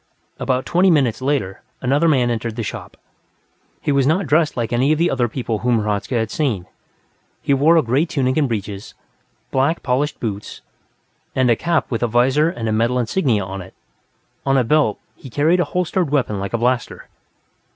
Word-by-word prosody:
About 130 0 -1
twenty 185 +2 +3
minutes 135 -8 +2
later, 130 -9 -1 0.2
another 140 +6 +2
man 130 -6 +3
entered 115 -1 -3
the 115 - -3
shop. - - -7 0.8
He - - 0
was 140 -1 +2
not 180 +6 +2
dressed 155 +1 +2
like 120 0 -2
any 130 +5 +2
of 155 - +2
the 170 +2 +2
other 125 -2 +1
people 115 -2 -3
whom 120 -1 +1
Hradzka 105 +3 -2
had 110 -1 -1
seen; 120 - -1 0.7
he 140 - 0
wore 155 +5 +4
a 160 - +4
gray 135 +8 +1
tunic 130 -5 0
and 150 -3 +2
breeches, 105 -3 -5 0.6
polished 140 +5 +1
black 140 +3 0
boots, 105 -3 -5 0.7
and 130 -2 +3
a - - +4
cap 170 +4 -1
with 115 - -1
a 120 - +2
visor 130 +7 +3
and 115 -8 -4
a - - 0
metal 115 +3 +1
insignia 120 - +1
on 95 +1 -6
it; 95 - -13 0.7
on 135 0 +2
a 130 - +3
belt, 150 +6 +2 0.2
he 135 - -12
carried 155 +8 +2
a 175 - +2
holstered 180 0 -1
weapon 125 -8 0
like 100 +3 -5
a - - +2
blaster. 125 +1 -1
130 Hz, 190 wpm, -20 LUFS, 115-150 Hz, 0.8 s, wore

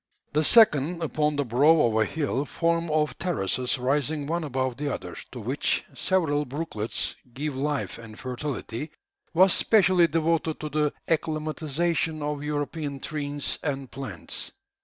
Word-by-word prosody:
The 155 +1 +3
second, 170 - +5
upon 150 -1 +1
the 145 -1 0
brow 145 +7 +5
of 115 -4 +2
a 110 0 +4
hill, 145 -3 -1
formed 165 +3 0
of 150 -1 0
terraces 130 - 0
rising 145 +3 0
one 165 +3 -1
above 130 -3 -2
the 145 0 -2
other, - - -5 0.2
to - - -7
which - - 0
several 160 -6 +1
brooklets 135 -6 -3 0.2
give 145 +1 -3
life 145 -2 -2
and 110 -2 -11
fertility, 130 +1 -4 0.5
was 185 +2 +7
specially 185 -5 +5
devoted 165 0 0
to 155 - -3
the 150 0 +1
acclimatisation 155 0 -1
of 145 -1 -2
European 145 -1 -3
trees 145 0 -2
and 135 -3 -3
plants. 110 -11 -5
150 Hz, 140 wpm, -26 LUFS, 135-160 Hz, 0.5 s, was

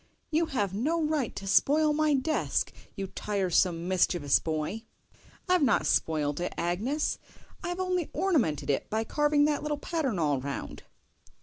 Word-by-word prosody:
"YOU 325 +1 +2
have 205 - -1
no 295 +12 0
right 300 -6 -1
to 195 - -6
spoil 300 +9 +3
my 305 -1 +2
desk, 295 +4 0 0.2
you 195 -3 -3
tiresome, 185 -3 0
mischievous 175 -6 +2
boy!" 160 +7 -3 0.7
"I've 365 -1 +3
not 250 -7 +3
spoilt 150 -2 +1
it, 175 - -3
Agnes; 215 - -1 0.4
I've 350 +1 -3
only 365 -3 -1
ornamented 285 - +1
it 135 - -2
by 220 +1 0
carving 295 +4 +2
that 295 -1 +1
little 300 -1 -2
pattern 290 - -2
all 145 -5 +1
round." 140 +1 -5
240 Hz, 145 wpm, -28 LUFS, -, 0.7 s, spoil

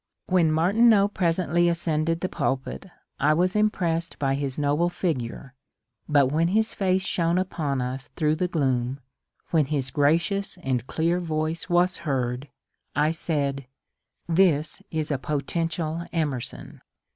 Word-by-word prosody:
When 175 -4 +3
Martineau 200 +6 +4
presently 175 -2 +1
ascended 165 -1 0
the 185 - 0
pulpit 135 +4 -3 0.3
I 150 +1 +3
was 180 +4 +1
impressed 180 -5 0
by 135 -1 0
his 135 -1 -2
noble 150 +4 +1
figure, 135 -7 -3 0.6
but 140 -3 +4
when 165 +3 +2
his 220 +4 +1
face 190 -2 +1
shone 170 -1 +1
upon 150 -8 -1
us 130 +2 -5
through 155 -1 +1
the 180 - 0
gloom, 130 -5 0 0.5
when 160 -4 +3
his 135 -2 -2
gracious 170 +9 +1
and 130 -2 -1
clear 170 +2 0
voice 160 0 -2
was 180 +1 +3
heard, 130 -2 -2 0.5
I 150 +2 +3
said, 140 -5 -2 0.6
this 165 -3 +2
is 155 -1 -2
a 140 - 0
potential 165 +4 -2
Emerson 150 -7 -4
160 Hz, 135 wpm, -25 LUFS, 140-175 Hz, 0.6 s, Martineau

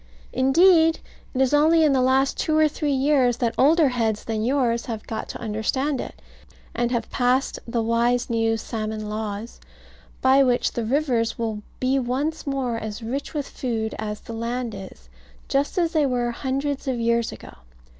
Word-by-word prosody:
Indeed, 325 +5 +5 0.4
it 260 - +1
is 265 +1 +2
only 315 +2 +5
in 300 -3 +4
the 260 - +3
last 265 +1 +2
two 310 -1 0
or 310 0 +5
three 295 0 -2
years 265 -3 +2
that 235 -2 0
older 305 +1 +4
heads 225 -4 -1
than 220 -1 -2
yours 240 -2 +1
have 225 -3 -5
got 220 -1 -5
to - - -5
understand 250 +6 -1
it, - - -10 0.5
and 240 0 0
have 240 -2 -2
passed 255 +2 +1
the 230 -1 -1
wise 235 +2 +1
new 225 -1 +1
salmon 215 -1 -4
laws, 215 +1 -5 0.6
by 265 +1 +5
which 250 -2 +2
the 235 - -3
rivers 250 -3 0
will 220 -2 -3 0.2
be 260 +1 +1
once 280 +6 -2
more 260 -4 -1
as 220 0 -6
rich 270 +7 -4
with 290 -2 -2
food 225 -4 -3
as 210 -1 -4
the 230 - -9
land 235 +1 -3
is, 190 - -11 0.4
just 280 +6 0
as 340 -2 +2
they 305 -3 +3
were 245 -2 0
hundreds 275 +3 -3
of 255 -2 -1
years 235 0 +1
ago. - - -11
245 Hz, 175 wpm, -23 LUFS, 230-275 Hz, 0.6 s, Indeed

